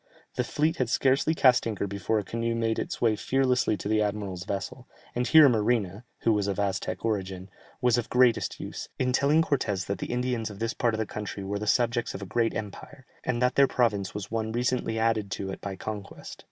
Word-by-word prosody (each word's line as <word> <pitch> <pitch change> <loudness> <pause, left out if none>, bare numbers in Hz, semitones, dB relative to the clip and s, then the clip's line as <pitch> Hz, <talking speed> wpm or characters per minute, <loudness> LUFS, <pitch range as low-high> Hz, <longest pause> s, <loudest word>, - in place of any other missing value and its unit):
The - - 0
fleet 155 +2 0
had 125 -3 0
scarcely 135 +6 +2
cast 125 -5 +4
anchor 105 -3 -2
before 100 +2 -1
a 105 - 0
canoe 115 +3 -2
made 115 -1 0
its - - -4
way 115 -2 +3
fearlessly 125 -2 +1
to - - -5
the 110 0 +2
admiral's 100 -4 -3
vessel, 100 - -5 0.3
and 125 +1 -1
here 155 -2 +8
Marina 110 -3 0 0.2
(who 115 - +3
was 105 -1 0
of 100 0 -2
Aztec 100 +2 -2
origin) 95 -3 -3 0.3
was 125 -1 +3
of 120 - -3
the - - -24
greatest 125 -2 +3
use, - - -6
in 125 -1 0
telling 145 +5 +4
Cortès 105 -11 -1
that 100 -1 -3
the - - -4
Indians 120 -2 -1
of 100 - -9
this 115 +3 -2
part 120 -2 0
of - - -4
the 110 - -1
country 105 -1 -6
were 100 +1 -3
the 105 - -4
subjects 120 +1 +1
of 95 - -6
a - - -5
great 115 +4 0
empire, 115 +6 -7 0.2
and 125 0 0
that 125 0 +3
their 140 0 +5
province 105 -8 0
was 105 -1 -6
one 110 -1 -2
recently 120 -1 -1
added 110 -2 +1
to 95 0 -4
it - - -8
by 100 -1 -5
conquest. 105 0 -7
115 Hz, 220 wpm, -27 LUFS, 100-125 Hz, 0.3 s, here